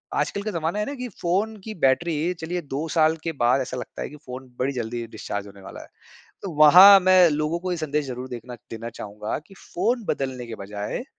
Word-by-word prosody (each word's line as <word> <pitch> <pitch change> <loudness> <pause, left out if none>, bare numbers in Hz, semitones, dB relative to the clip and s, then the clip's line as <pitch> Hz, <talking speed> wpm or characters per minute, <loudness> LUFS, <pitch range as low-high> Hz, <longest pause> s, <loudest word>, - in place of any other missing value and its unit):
आजकल 200 - -1
का 215 - -3
ज़माना 170 +2 -2
है 210 - 0
ना 280 - -5
कि 250 -1 -5
फ़ोन 200 +6 0
की 220 +1 -6
बैटरी 160 +5 +2
चलिए 175 +2 -3
2 145 +2 -4
साल 160 0 +4
के 165 - -2
बाद 125 +3 +4
ऐसा 130 - -5
लगता 125 - -7
है - - -4
कि 150 - -12
फ़ोन 130 +1 -8
बड़ी 135 +2 0
जल्दी 120 -1 -4
डिस्चार्ज 105 -2 -6
होने 100 0 -14
वाला - - -10
है। - - -13 0.5
तो 195 - -5
वहाँ 185 +6 +10
मैं 185 -1 +6
लोगों 155 +3 -1
को 185 0 -4
ये 175 - -1
संदेश 150 -2 -2
जरूर 125 0 -6
देखना 125 0 -8 0.2
देना 115 +1 -6
चाहूँगा 105 -2 -5
कि 195 - -16
फ़ोन 235 +6 -2
बदलने 130 -6 -3
के 115 - -6
बजाए 105 - -5
150 Hz, 220 wpm, -24 LUFS, 125-180 Hz, 0.5 s, वहाँ